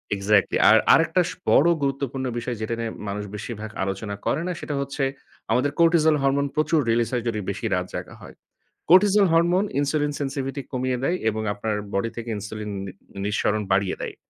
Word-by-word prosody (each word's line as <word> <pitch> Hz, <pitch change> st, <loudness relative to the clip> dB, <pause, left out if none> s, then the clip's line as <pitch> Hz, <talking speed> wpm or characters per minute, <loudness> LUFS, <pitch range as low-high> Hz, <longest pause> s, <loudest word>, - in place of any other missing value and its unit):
Exactly. 100 Hz, 0 st, +2 dB
আর 110 Hz, -, +8 dB, 0.2 s
আরেকটা 165 Hz, +3 st, +4 dB
স -, -, -5 dB, 0.2 s
বড় 160 Hz, -, +5 dB, 0.2 s
গুরুত্বপূর্ণ 135 Hz, -1 st, -2 dB
বিষয় 120 Hz, +1 st, -4 dB
যেটা 110 Hz, +2 st, -2 dB
নিয়ে 115 Hz, -1 st, -2 dB, 0.2 s
মানুষ 105 Hz, +1 st, -3 dB
বেশিরভাগ 110 Hz, 0 st, -6 dB
আলোচনা 95 Hz, +2 st, -3 dB
করে -, -, 0 dB
না। -, -, -1 dB
সেটা 145 Hz, -, -4 dB
হচ্ছে 140 Hz, 0 st, -3 dB, 0.5 s
আমাদের 130 Hz, +5 st, +2 dB
কোর্টিজল 165 Hz, -2 st, +5 dB
হরমোন 140 Hz, +1 st, +2 dB
প্রচুর 155 Hz, +1 st, +2 dB
রিলিজ 115 Hz, -1 st, +1 dB
হয় 120 Hz, -, 0 dB
যদি 110 Hz, -2 st, -2 dB
বেশি -, -, -6 dB
রাত -, -, -1 dB
জাগা -, -, -6 dB
হয়। -, -, -12 dB, 0.5 s
কোর্টিজল 200 Hz, +3 st, +6 dB
হরমোন 175 Hz, +4 st, +3 dB
ইনসুলিন 145 Hz, +1 st, 0 dB
সেনসিভিটি 135 Hz, 0 st, -3 dB
কমিয়ে 130 Hz, 0 st, -1 dB
দেয় 175 Hz, +5 st, +1 dB
এবং 110 Hz, 0 st, -3 dB
আপনার 105 Hz, +1 st, -2 dB, 0.2 s
বডি 100 Hz, +4 st, 0 dB
থেকে 115 Hz, 0 st, -5 dB
ইনসুলিন 105 Hz, +1 st, -6 dB, 0.2 s
নি 95 Hz, -, -6 dB, 0.3 s
নিঃসরণ 105 Hz, +1 st, 0 dB
বাড়িয়ে 95 Hz, 0 st, +1 dB
দেয়। -, -, -5 dB
130 Hz, 175 wpm, -24 LUFS, 110-150 Hz, 0.5 s, আর